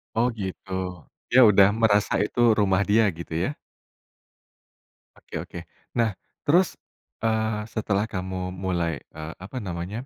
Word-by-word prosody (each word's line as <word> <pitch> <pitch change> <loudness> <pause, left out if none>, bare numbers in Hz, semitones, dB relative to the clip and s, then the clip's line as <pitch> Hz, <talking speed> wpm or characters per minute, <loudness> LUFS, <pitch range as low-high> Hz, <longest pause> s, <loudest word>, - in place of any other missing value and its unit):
Oh, 120 +2 +3
gitu, 95 0 -6 0.6
dia 130 - +6
udah 100 -1 +7
merasa 105 -3 +3
itu 105 - -4 0.2
rumah 95 -1 +3
dia 110 +2 +5
gitu 85 0 -8
ya. 145 +3 -2 1.6
Oke - - -12
oke. - - -8 0.4
Nah 115 -3 +2 0.3
terus, 175 +5 +3 0.5
eee, 110 -1 +1
setelah 105 -1 0
kamu 95 -2 -4
mulai 85 -4 -2 0.2
eee, 80 +1 -6
apa 105 +7 -7
namanya, 95 +4 -4
100 Hz, 125 wpm, -25 LUFS, 95-110 Hz, 1.6 s, udah